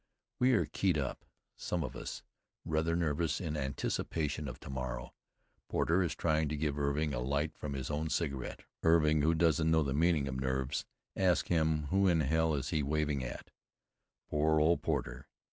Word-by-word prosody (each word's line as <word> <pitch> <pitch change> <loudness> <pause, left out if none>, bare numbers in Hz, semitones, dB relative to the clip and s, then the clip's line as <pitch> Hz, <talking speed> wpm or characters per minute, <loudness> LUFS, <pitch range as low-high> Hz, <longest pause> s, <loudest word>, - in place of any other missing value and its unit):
We 125 +1 +4
are 110 - +3
keyed 90 -5 +1
up, 70 -3 -3 0.3
some 85 -2 -2
of - - -5
us, - - -6 0.4
rather 80 +1 +1
nervous 80 -1 0
in 80 -4 -3
anticipation 75 +2 -2
of 65 - -7
to - - -9
morrow. 65 -2 -4 0.6
Porter 85 +3 +2
is 80 -5 -1
trying 80 -2 +1
to 75 - -2
give 75 -1 -1
Irving 70 +1 0
a - - -1
light 70 +5 -1
from 75 -2 -5
his 65 +2 -4
own 75 +2 -1
cigarette. 70 -4 -2 0.2
Irving, 80 -2 +4
who 80 +3 +3
doesn't 80 -1 +3
know 80 -1 +4
the 70 -2 -1
meaning 80 -1 +2
of 65 -1 -3
nerves, 65 +1 -1 0.3
asks 90 -3 +2
him 80 -2 +2
who 95 0 +4
in 85 -3 +4
hell 80 +2 +2
he 70 +3 -1
is - - 0
waving 75 -1 0
at. - - -7 0.8
Poor 75 +1 +2
old 80 +3 +3
Porter! 70 -3 -2
75 Hz, 180 wpm, -33 LUFS, 70-80 Hz, 0.8 s, We